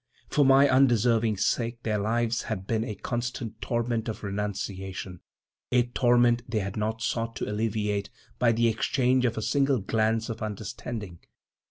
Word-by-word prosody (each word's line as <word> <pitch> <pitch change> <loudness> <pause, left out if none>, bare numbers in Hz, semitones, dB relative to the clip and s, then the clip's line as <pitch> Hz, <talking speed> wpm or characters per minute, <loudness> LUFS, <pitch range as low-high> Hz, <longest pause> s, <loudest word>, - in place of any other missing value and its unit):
For 145 - +4
my 135 +1 +6
undeserving 120 -4 +3
sake 115 +4 -1
their 105 -2 0
lives 115 +2 0
had 95 -4 -3
been 110 +1 0
a 110 -3 -4
constant 120 0 -4
torment 120 -1 -1
of 110 0 -6
renunciation—a 100 +2 -4
torment 120 -1 +4
they 115 - -1
had 100 -1 -2
not 110 +1 -2
sought 115 0 -2
to - - -3
alleviate 105 -1 -1 0.3
by 120 -2 +4
the 115 +1 +2
exchange 125 +3 +2
of 115 -2 0
a 110 - -2
single 140 +1 +2
glance 110 +2 0
of 115 -1 -6
understanding. 105 -2 -5
115 Hz, 150 wpm, -27 LUFS, 105-120 Hz, 0.3 s, my